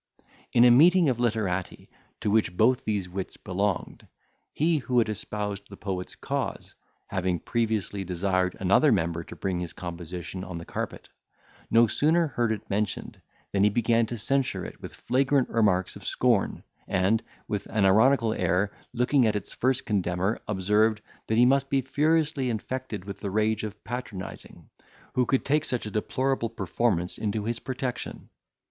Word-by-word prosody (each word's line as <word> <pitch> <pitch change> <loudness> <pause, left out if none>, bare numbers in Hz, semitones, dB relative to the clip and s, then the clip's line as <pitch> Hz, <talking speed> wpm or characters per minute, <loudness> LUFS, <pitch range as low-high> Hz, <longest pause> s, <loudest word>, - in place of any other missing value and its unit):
In 120 0 +6
a 120 - +8
meeting 170 +5 +6
of 120 -2 -1
literati, 105 -6 -1 0.3
to 105 - 0
which 105 -5 +2
both 125 -1 +3
these 105 -4 -1
wits 95 +1 -6
belonged, 95 +1 -2 0.4
he 160 +1 +2
who 125 -1 -1
had 115 - +4
espoused 105 -1 -4
the 100 - -10
poet's 95 -2 -4
cause, - - -4 0.4
having 90 -1 0
previously 110 -4 -1
desired 90 0 0
another - - +4
member 85 0 0
to - - -11
bring 95 -2 -2
his 90 -2 -5
composition 90 +1 -6
on 90 -2 -6
the 85 - -7
carpet, - - -5 0.6
no 115 +1 +6
sooner 160 +8 +2
heard 120 -4 0
it 110 0 -4
mentioned, 105 0 -3 0.3
than 100 -1 +2
he 105 - +6
began 115 +1 +2
to 120 - -5
censure 115 -5 0
it - - -10
with - - -8
flagrant 135 +1 +1
marks 95 -3 +2
of 100 - -11
scorn, 120 0 +1 0.2
and, 95 +4 +2 0.3
with 105 -1 -3
an 105 -3 +1
ironical 110 +3 +4
air, 90 +3 +1 0.2
looking 125 +1 +3
at 105 - +1
its 105 - -4
first 130 +1 0
condemner, 95 0 0
observed, 105 +2 +2 0.3
that 110 - +1
he 120 - +7
must 135 +1 +3
be 135 - +2
furiously 150 0 +1
infected 115 -2 -4
with 100 -1 -7
the 100 - -3
rage 110 +2 +1
of 105 -1 -7
patronising, 115 -5 -7 0.5
who 125 -1 +2
could 135 - +1
take 150 +2 +2
such 125 -7 -1
a 105 - -5
deplorable 130 +3 0
performance 95 -3 -1
into 110 -1 -1
his 115 0 -2
protection. 130 -1 -5
110 Hz, 165 wpm, -27 LUFS, 95-125 Hz, 0.6 s, a